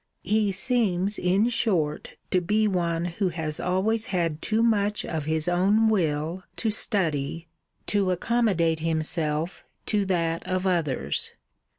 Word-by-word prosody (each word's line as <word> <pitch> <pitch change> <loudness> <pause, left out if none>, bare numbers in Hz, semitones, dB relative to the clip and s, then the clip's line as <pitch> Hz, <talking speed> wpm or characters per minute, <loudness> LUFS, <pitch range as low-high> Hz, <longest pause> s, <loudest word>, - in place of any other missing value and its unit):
He 210 +2 +1
seems, 200 -2 0
in 195 +6 +2
short, 175 -11 0 0.2
to 185 - +3
be 210 +4 +2
one, 170 -3 0
who 180 +2 -1
has 160 -3 -3
always 215 +6 0
had 170 -7 -1
too 220 +1 +1
much 210 -2 +1
of 155 -3 -3
his 155 +1 0
own 200 +5 +3
will 165 -3 0
to 220 - 0
study 165 - 0 0.4
to 200 -2 +1
accommodate 180 -4 +1
himself 160 +1 -1 0.2
to 210 -2 +1
that 165 -3 0
of 185 0 -1
others. 150 - -1
180 Hz, 130 wpm, -26 LUFS, 165-210 Hz, 0.4 s, to